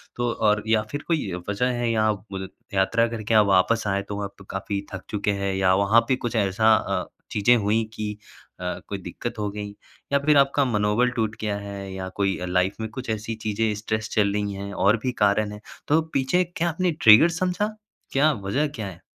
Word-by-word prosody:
तो 120 -1 0
और 105 -1 +1
या 110 -1 +3
फिर 145 0 -3
कोई 155 - 0 0.2
वजह 105 +5 0
है, 120 -2 0
यहाँ 110 -1 +2 0.2
मुदित 95 0 -5 0.2
यात्रा 115 +5 +3
करके 115 -1 -3
आप 105 -1 +6
वापस 100 +4 +3
आए, 100 0 +1
तो 100 0 -6
वहाँ 100 -1 -3
पे 95 - -14
काफ़ी 100 +1 -3
थक 95 - -6
चुके 105 0 0
हैं 100 -1 0
या 95 -1 +3
वहाँ 110 +4 +5
पे 130 - +3
कुछ 120 0 -2
ऐसा 110 +2 +3
अ, - - -1 0.3
चीज़ें 115 +4 +4
हुई 110 +2 +1
कि 105 -1 -3 0.5
अ, 90 0 -3
कोई 100 - -4
दिक्कत 110 +6 -6
हो 105 -1 -1
गई 105 0 -5 0.4
या 140 - +5
फिर 150 -1 +5
आपका 140 0 +4
मनोबल 105 +1 +2
टूट 110 -3 -2
गया 105 -2 -1
है 100 -1 -7
या 95 0 -5
कोई 100 -1 +1
अ, 90 - -3
लाइफ़ 90 +2 +1
में 110 - -3
कुछ 125 +1 -7
ऐसी 110 +1 -3
चीज़ें, 110 0 0
स्ट्रेस 110 +1 -3
चल 100 -2 +2
रही 105 -1 -1
हैं 100 +1 -6
और 105 +4 +3
भी 130 - 0
कारण 105 +1 +2
हैं? 105 0 -9 0.3
तो 155 +2 +4
पीछे 140 +7 +2
क्या 170 +1 +1
आपने 175 +2 0
ट्रिगर 115 +10 +8
समझा? 195 +4 -1 0.4
क्या 150 +3 +4
वजह 120 +8 -1
क्या 115 -8 -6
है? 85 -2 -10
105 Hz, 215 wpm, -24 LUFS, 100-120 Hz, 0.5 s, ट्रिगर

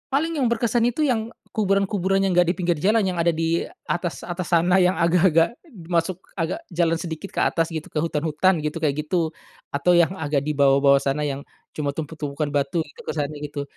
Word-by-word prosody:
Paling 320 +5 0
yang 255 -6 +1
berkesan 235 0 +1
itu 245 +6 +1
yang 230 -3 -1 0.2
kuburan-kuburan 195 -2 +1
yang 195 -2 +1
nggak 180 - +6
dipinggir 175 -1 0
jalan, 215 +4 +4
yang 185 - -1
ada 170 0 +2
di 165 +1 0 0.2
atas-atas 175 +1 -3
sana, 175 +2 +4
yang 180 -1 +5
agak-agak 170 +3 +3 0.3
masuk 175 +1 0 0.2
agak 165 -1 -2
jalan 165 -1 0
sedikit 165 +3 -6
ke - - -3
atas 165 0 +1
gitu, 160 -1 -5
ke - - -23
hutan-hutan 165 +3 +1
gitu, 150 +1 -3
kayak 150 0 0
gitu. 165 -2 0 0.4
Atau 160 +6 +2
yang 170 0 +4
agak 145 -2 0
dibawah-bawah 140 -1 +4
sana, 140 +2 -1
yang 140 -1 -4 0.2
cuma 145 -2 -3
tumpuk-tumpukan 150 -1 -4
batu 145 +3 0
gitu, 465 - -19
kesannya 150 -1 -3
gitu. 145 -1 -5
170 Hz, 180 wpm, -23 LUFS, 150-190 Hz, 0.4 s, nggak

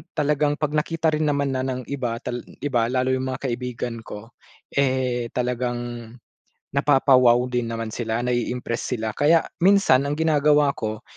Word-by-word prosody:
talagang 150 -1 +1
'pag 150 -2 -1
nakita 160 +1 0
rin 155 0 0
naman 140 -1 0
na 130 - -1
ng 130 -1 -3
iba, 120 -4 -2
tal 125 0 -3 0.2
iba, 120 -5 +1
lalo 130 0 +1
yung 130 0 -2
mga 135 +1 -4
kaibigan 120 -1 -4
ko, 105 +3 -9 0.4
eh, 130 -3 +1
talagang 120 -2 -3 0.6
napapa-wow 135 -4 +5
din 125 -1 -1
naman 115 -1 -4
sila 115 -1 -2
nai-impress 125 0 -2
sila. 110 -2 -3
Kaya 160 +5 +4 0.2
minsan 195 -9 +5
ang 145 - -1
ginagawa 150 -2 +3
ko, 110 -2 -4
130 Hz, 150 wpm, -23 LUFS, 120-145 Hz, 0.6 s, napapa-wow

